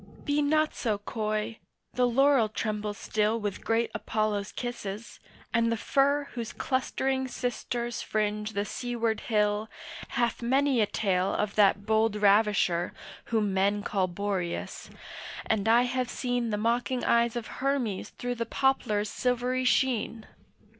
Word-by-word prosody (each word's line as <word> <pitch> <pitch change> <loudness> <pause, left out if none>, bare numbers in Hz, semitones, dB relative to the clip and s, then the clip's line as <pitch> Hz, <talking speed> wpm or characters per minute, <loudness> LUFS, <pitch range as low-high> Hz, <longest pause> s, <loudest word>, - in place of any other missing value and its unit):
Be 290 +1 +2
not 310 +1 +2
so 220 -4 -1
coy, 215 +1 -3 0.3
the 250 0 +3
laurel 265 -2 +4
trembles 210 -1 -3
still 215 +1 0
With 205 -3 -4
great 230 +1 +1
Apollo's 215 -2 -1
kisses, 230 -3 -6 0.3
and 230 0 +3
the 230 - 0
fir 280 +5 +2
Whose 235 -2 -5
clustering 265 0 -1
sisters 240 -1 -3
fringe 210 0 -1
the 200 0 -1
seaward 230 -2 -2
hill 210 -1 0 0.4
Hath 240 -3 -1
many 265 +1 +2
a 210 - +3
tale 190 -3 0
of 210 -1 -1
that 200 -1 +3
bold 220 0 +2
ravisher 205 -4 +3 0.3
Whom 215 -4 0
men 200 +2 +1
call 195 -3 0
Boreas, 185 -1 -3 0.6
and 215 -1 0
I 235 +2 +6
have 250 0 -1
seen 245 -2 -1
The 210 - -1
mocking 240 +3 0
eyes 235 0 +3
of 235 -2 -3 0.2
Hermes 260 -8 -1
through 245 0 -4
the 230 - -1
poplar's 235 -6 +1
silvery 250 +2 0
sheen. 235 -3 +1
225 Hz, 140 wpm, -28 LUFS, 210-245 Hz, 0.6 s, I